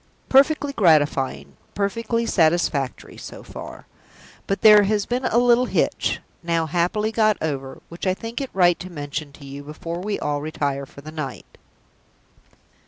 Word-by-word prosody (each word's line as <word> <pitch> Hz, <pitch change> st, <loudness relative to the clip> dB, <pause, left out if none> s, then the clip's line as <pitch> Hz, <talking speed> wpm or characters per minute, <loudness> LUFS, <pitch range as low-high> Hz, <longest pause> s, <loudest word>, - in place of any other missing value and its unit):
Perfectly 280 Hz, +1 st, +4 dB
gratifying, 140 Hz, -, +2 dB, 0.2 s
perfectly 230 Hz, +4 st, -1 dB
satisfactory, 160 Hz, -, 0 dB
so -, -, -9 dB
far! -, -, -10 dB, 0.6 s
But 195 Hz, -, -1 dB
there 210 Hz, -1 st, +9 dB
has 205 Hz, 0 st, +1 dB
been 250 Hz, +2 st, -2 dB
a 230 Hz, -, +1 dB
little 245 Hz, +1 st, +4 dB
hitch -, -, 0 dB, 0.2 s
now 170 Hz, -2 st, 0 dB
happily 180 Hz, +7 st, 0 dB
got 215 Hz, -2 st, +3 dB
over 135 Hz, -4 st, -4 dB
which 170 Hz, +3 st, -6 dB
I 185 Hz, -, +2 dB
think 230 Hz, +6 st, -6 dB
it 270 Hz, -, -4 dB
right 175 Hz, -2 st, +3 dB
to 185 Hz, -, -7 dB
mention 145 Hz, -2 st, -5 dB
to 140 Hz, -, -13 dB
you 140 Hz, +1 st, -8 dB
before 160 Hz, +4 st, -6 dB
we 205 Hz, +2 st, -2 dB
all 145 Hz, -1 st, -2 dB
retire 140 Hz, -3 st, -2 dB
for 140 Hz, -, -13 dB
the 155 Hz, +2 st, -9 dB
night." 140 Hz, -7 st, -7 dB
170 Hz, 155 wpm, -23 LUFS, 145-215 Hz, 0.6 s, there